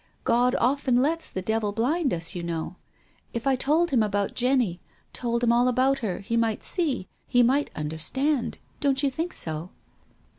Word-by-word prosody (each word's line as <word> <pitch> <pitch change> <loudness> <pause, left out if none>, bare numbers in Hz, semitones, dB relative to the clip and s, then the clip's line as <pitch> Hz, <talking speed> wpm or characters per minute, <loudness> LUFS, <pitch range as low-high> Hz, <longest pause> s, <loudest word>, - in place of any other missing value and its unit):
God 245 +2 +3
often 260 0 +2
lets 315 +6 +1
the 185 - -5
devil 220 0 0
blind 275 +7 +1
us, 165 +1 -2
you 175 - -4
know. 170 0 -4 0.6
If 235 +2 -4
I 270 -1 +3
told 305 +6 +1
him 250 -4 +3
about 205 -2 0
Jenny, 245 -9 +1 0.3
told 235 -1 -2
him 235 - +4
all 240 +1 +4
about 260 +2 +2
her, 205 -7 -3
he 230 +4 -2
might 230 -2 0
see 285 - 0
— - - -43
he 245 -1 +4
might 270 +5 +2
understand. 230 - -1 0.3
Don't 275 0 +2
you 275 - +2
think 325 +6 -3
so 160 +2 -5
245 Hz, 180 wpm, -26 LUFS, 205-275 Hz, 0.6 s, him